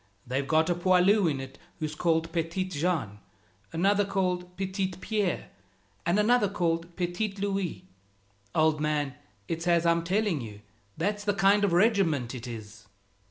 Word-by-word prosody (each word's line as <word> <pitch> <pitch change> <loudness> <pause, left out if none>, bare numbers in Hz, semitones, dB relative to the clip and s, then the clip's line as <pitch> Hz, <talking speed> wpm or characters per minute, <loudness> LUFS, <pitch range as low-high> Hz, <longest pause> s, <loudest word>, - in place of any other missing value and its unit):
They've 135 +3 -2
got 160 +1 +3
a 175 - +2
poilu 185 +2 +4
in 140 -3 -2
it 135 0 -9 0.2
who's 155 -1 -3
called 165 0 0
Petitjean, 165 - -1 0.5
another 200 +5 +2
called 180 -2 -2
Petitpierre, 190 0 -2 0.6
and 175 +3 +3
another 210 0 +3
called 170 -2 -1
Petitlouis. 195 +1 -2 0.7
Old 155 -1 +3
man, 150 -2 0 0.3
it's 165 +1 -3
as 170 -1 +3
I'm 170 0 +3
telling 190 -3 0
you; 105 -3 -9 0.4
that's 205 +5 -1
the 205 -1 0
kind 200 0 +4
of 200 - +3
regiment 170 - +2
it 125 -1 -7
is." 110 -3 -9
175 Hz, 135 wpm, -28 LUFS, 155-195 Hz, 0.7 s, poilu